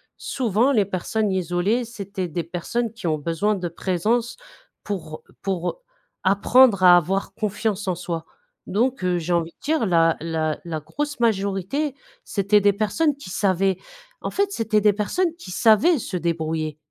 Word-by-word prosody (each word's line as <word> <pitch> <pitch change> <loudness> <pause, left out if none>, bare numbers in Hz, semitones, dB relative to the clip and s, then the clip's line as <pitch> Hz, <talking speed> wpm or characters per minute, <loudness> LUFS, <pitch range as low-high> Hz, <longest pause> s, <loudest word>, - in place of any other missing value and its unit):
souvent 245 +1 +1
les 210 -6 +3
personnes 205 +3 -1
isolées 185 +6 0
c'étaient 200 -5 -5
des 170 +2 -3
personnes 210 +7 -3
qui 230 - -10
ont 155 -1 +1
besoin 170 +7 0
de 180 -2 -3
présence 210 - -1 0.5
pour 170 -6 -5 0.2
pour 190 - -2 0.4
apprendre 200 +2 +5
à 180 -1 +9
avoir 190 +3 0
confiance 210 -1 -2
en 180 - 0
soi, 170 -2 -4 0.4
donc 240 +2 0
heu, 180 -1 +1
j'ai 175 +1 -2
envie 170 -1 +1
de - - -44
dire 305 -3 +1
la 165 -3 +3
la 160 -2 -1
la 165 -2 -4
grosse 290 - -4
majorité, 215 - 0 0.3
c'était 205 +1 +2
des 205 0 +5
personnes 270 +9 0
qui 280 - -10
savaient, 190 -1 +1 0.4
en - - -3
fait, 400 0 0
c'était 225 - +1
des 210 -1 +4
personnes 330 - -1
qui 270 - -10
savaient 225 - +4
se 200 - -5
débrouiller. 160 -2 -2
195 Hz, 160 wpm, -23 LUFS, 175-225 Hz, 0.5 s, à